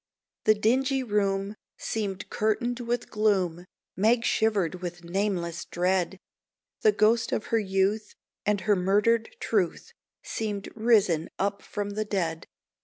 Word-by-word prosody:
The 215 Hz, -, +6 dB
dingy 260 Hz, +5 st, +2 dB
room 200 Hz, -2 st, 0 dB, 0.2 s
seemed 200 Hz, -4 st, -3 dB
curtained 240 Hz, +3 st, 0 dB
with 240 Hz, 0 st, -2 dB
gloom; 190 Hz, -5 st, +1 dB, 0.3 s
Meg 230 Hz, +4 st, +3 dB
shivered 195 Hz, -6 st, +1 dB
with 175 Hz, -1 st, -6 dB
nameless 175 Hz, -2 st, -1 dB
dread. 180 Hz, +1 st, 0 dB, 0.6 s
The 430 Hz, -, +6 dB
ghost 225 Hz, -, +3 dB
of -, -, -1 dB
her 225 Hz, -, +5 dB
youth 200 Hz, +2 st, 0 dB, 0.3 s
and 210 Hz, -1 st, +1 dB
her 210 Hz, 0 st, +3 dB
murdered 210 Hz, +5 st, +2 dB
truth 210 Hz, -, -1 dB, 0.3 s
Seemed 210 Hz, -3 st, -3 dB
risen 205 Hz, -8 st, +3 dB
up 200 Hz, +1 st, -1 dB
from 205 Hz, 0 st, -4 dB
the 215 Hz, +1 st, -1 dB
dead. 170 Hz, -6 st, -2 dB
205 Hz, 125 wpm, -27 LUFS, 190-220 Hz, 0.6 s, The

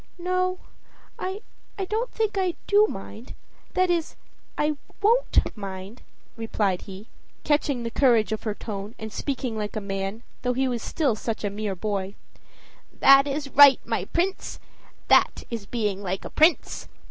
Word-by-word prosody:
"No, 365 Hz, +1 st, 0 dB, 0.6 s
I 380 Hz, +3 st, -4 dB, 0.5 s
don't 450 Hz, +5 st, -1 dB
think 435 Hz, -2 st, -1 dB
I 370 Hz, -3 st, 0 dB
do 415 Hz, +1 st, +5 dB
mind 220 Hz, -, -8 dB, 0.4 s
that 370 Hz, -1 st, +3 dB
is, 335 Hz, -2 st, -1 dB, 0.4 s
I 300 Hz, 0 st, +1 dB, 0.2 s
WON'T 460 Hz, +4 st, +2 dB
mind," 195 Hz, +1 st, -7 dB, 0.3 s
replied 210 Hz, -5 st, -1 dB
he, 195 Hz, +3 st, -9 dB, 0.4 s
catching 290 Hz, -4 st, +1 dB
the 230 Hz, -, -3 dB
courage 235 Hz, -6 st, +3 dB
of 220 Hz, -, -2 dB
her 215 Hz, -2 st, -3 dB
tone 205 Hz, 0 st, -6 dB
and 220 Hz, -1 st, -7 dB
speaking 260 Hz, -4 st, -3 dB
like 210 Hz, 0 st, -4 dB
a -, -, 0 dB
man, 195 Hz, +2 st, -4 dB, 0.2 s
though 250 Hz, 0 st, 0 dB
he 265 Hz, +2 st, +1 dB
was 240 Hz, -3 st, -2 dB
still 280 Hz, -8 st, 0 dB
such 220 Hz, 0 st, -4 dB
a 205 Hz, -, -1 dB
mere 205 Hz, -1 st, -3 dB
boy. 200 Hz, 0 st, -3 dB, 0.8 s
"That 275 Hz, +1 st, +7 dB
is 285 Hz, 0 st, -3 dB
right, 280 Hz, -1 st, +8 dB
my -, -, -1 dB
Prince! 370 Hz, +2 st, -2 dB, 0.5 s
that -, -, +4 dB
is 225 Hz, -4 st, -5 dB
being 210 Hz, -4 st, -2 dB
like 190 Hz, -1 st, -3 dB
a -, -, -7 dB
prince. 320 Hz, +3 st, +2 dB
240 Hz, 155 wpm, -25 LUFS, 205-320 Hz, 0.8 s, right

